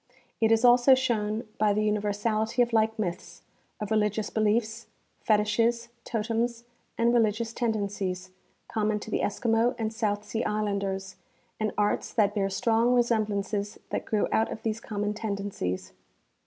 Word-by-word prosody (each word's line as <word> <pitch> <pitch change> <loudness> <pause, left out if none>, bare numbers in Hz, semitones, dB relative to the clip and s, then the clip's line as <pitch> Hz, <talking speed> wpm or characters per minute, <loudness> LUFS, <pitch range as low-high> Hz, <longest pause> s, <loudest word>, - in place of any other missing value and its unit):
It 225 -1 +3
is 225 +2 +4
also 245 +2 +7
shown 225 -4 -1
by 210 -1 +3
the 210 +1 +1
universality 215 +3 +1
of 235 -1 -4
like 220 0 +2
myths, 180 -5 -5 0.4
of 210 0 -5
religious 210 -1 +1
beliefs, 220 +1 0 0.4
fetiches, 230 +2 +2 0.2
totems 230 +1 -1 0.3
and 235 +1 +3
religious 225 0 +1
tendencies, 200 -5 -2 0.4
com 215 -1 -1
mon 215 -1 0
to 220 - -8
the - - +1
Eskimo 225 +3 +1
and 220 -1 -2
South 210 -2 -1
Sea 225 - -2
islanders, 200 -2 -2 0.4
and 215 -1 0
arts 205 0 0
that 205 -3 +3
bear 195 -2 0
strong 230 +5 +2
resemblances 210 -3 0
that - - -2
grew 215 -2 +1
out 220 - +2
of - - -7
these 220 0 -1
common 210 -1 -2
tendencies. 200 - -4
215 Hz, 145 wpm, -27 LUFS, 205-230 Hz, 0.4 s, also